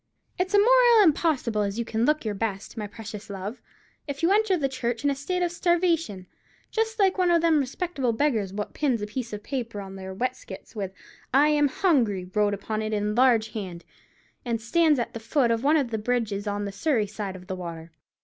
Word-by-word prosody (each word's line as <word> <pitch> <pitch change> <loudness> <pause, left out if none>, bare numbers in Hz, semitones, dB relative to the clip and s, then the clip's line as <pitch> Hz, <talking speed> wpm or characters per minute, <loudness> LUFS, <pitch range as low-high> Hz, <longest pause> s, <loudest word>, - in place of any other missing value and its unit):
It's 375 +3 +1
a - - +7
moriel 480 0 +6
impossible 290 - +2
as 200 +1 -2
you 235 - -1
can 225 0 0
look 300 -2 +1
your 215 - -1
best, 205 0 -4
my 215 -3 -4
precious 215 0 -9
love, 200 +4 -6 0.5
if 285 +2 -5
you 340 - +4
enter 410 -2 +3
the 280 -4 0
church 245 -2 -3
in 285 - +3
a - - -1
state 360 +6 -2
of 350 - 0
starvation, 335 - +1 0.5
just 445 0 -1
like 390 -2 +2
one 365 -1 +3
of 340 -1 +3
them 325 -2 +4
respectable 275 -1 -1
beggars 225 -6 0
wot 205 +1 -5
pins 255 -8 0
a - - 0
piece 230 +3 -5
of 210 0 -6
paper 235 -6 -4
on 195 -1 -8
their 190 0 -7
weskits 240 -3 -5
with 195 -3 -3 0.4
'I 290 +2 +6
AM 295 -1 +3
HUNGRY' 230 - +1
wrote 205 -1 +2
upon 215 +2 -3
it 215 0 -3
in 210 0 0
large 235 -2 +4
hand, 185 -6 -6 0.6
and 235 -2 -1
stands 310 +6 +3
at 240 - -2
the 230 - -5
foot 235 +2 +1
of 230 +1 0
one 300 +3 +4
of 265 -6 -1
the 220 - -1
bridges 215 -3 -1
on 205 0 -2
the 200 - -4
Surrey 220 +2 +1
side 205 -2 -5
of 180 -1 -11
the 190 - -4
water. 170 -2 -7
235 Hz, 215 wpm, -26 LUFS, 205-305 Hz, 0.6 s, a